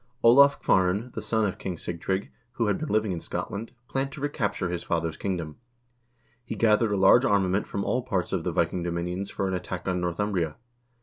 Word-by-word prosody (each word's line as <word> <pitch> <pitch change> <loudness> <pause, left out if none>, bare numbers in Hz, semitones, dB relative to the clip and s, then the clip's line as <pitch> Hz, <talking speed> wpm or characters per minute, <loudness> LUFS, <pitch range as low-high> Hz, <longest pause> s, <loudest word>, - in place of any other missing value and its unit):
Olav 140 +4 +7
Kvaaran, 95 +6 +2
the - - -4
son 110 -1 +1
of 95 - -3
King 90 -3 -4
Sig 85 0 -6
trygg, 95 +1 -2 0.2
who 115 - 0
had 105 -2 +1
been 155 - -4
living 110 -1 +1
in 85 - -2
Scotland, 100 +6 -5 0.2
planned 135 +1 -2
to - - -8
recapture 105 -10 -1
his 85 -1 -3
father's 85 -2 -1
kingdom. 85 -6 -4 0.9
He 120 - -5
gathered 110 -1 +3
a 100 - +1
large 95 +6 +6
armament 100 -5 +2
from 100 - -3
all 125 - +1
parts 100 -8 -2
of - - 0
the - - -1
Viking 90 - 0
dominions 90 +3 -3
for 95 - -2
an 95 - -2
attack 90 - -4
on 90 -1 0
Northumbria. 90 -2 -1
100 Hz, 200 wpm, -27 LUFS, 90-110 Hz, 0.9 s, Olav